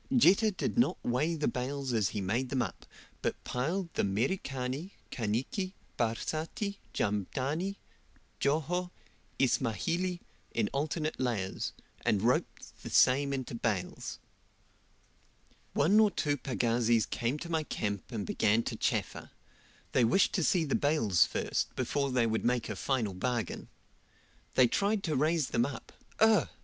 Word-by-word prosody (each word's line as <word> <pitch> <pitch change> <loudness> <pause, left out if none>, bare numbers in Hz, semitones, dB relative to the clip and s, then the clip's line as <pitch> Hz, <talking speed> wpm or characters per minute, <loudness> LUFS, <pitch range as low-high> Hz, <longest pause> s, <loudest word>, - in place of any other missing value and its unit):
Jetta 215 0 +6
did 210 +3 -2
not 240 - +3
weigh 150 +8 +1
the 150 -2 0
bales 130 0 -2
as 110 -4 +2
he 105 - -3
made 115 +7 -1
them 130 -2 +1
up, - - -7 0.3
but - - -2
piled 170 +8 -2
the - - 0
Merikani, 130 - -2 0.2
Kaniki, 130 - -2 0.2
Barsati, 160 - -2
Jamdani, 135 - -1 0.6
Joho, 160 +5 0 0.5
Ismahili, 135 - 0 0.4
in 110 -3 +1
alternate 155 +2 -1
layers, 115 -7 -1 0.3
and 100 -1 +2
roped 125 +2 -1
the - - -7
same 140 +2 +4
into 130 -3 -3
bales. 110 -5 -2 1.6
One 190 +9 +4
or 215 -1 +6
two 145 -7 0
pagazis 120 -4 +1
came 120 +5 -1
to 170 +2 -7
my 160 -1 +2
camp 105 -8 -3
and 110 -4 -3
began 110 +5 +2
to - - -3
chaffer; - - -1 0.6
they 125 - +3
wished 120 +12 +4
to 180 - +1
see 175 +1 +3
the 145 - -2
bales 115 - +3
first, - - -2
before 140 +2 0
they 125 -2 +2
would 110 -1 0
make 120 -2 +1
a 105 - -3
final 115 -1 -1
bargain. 115 +2 -2 0.9
They 130 - +7
tried 200 - +1
to 155 -3 0
raise 155 +1 +2
them 120 - +2
up 140 - -8 0.3
ugh! 215 - +5
130 Hz, 140 wpm, -31 LUFS, 115-160 Hz, 1.6 s, They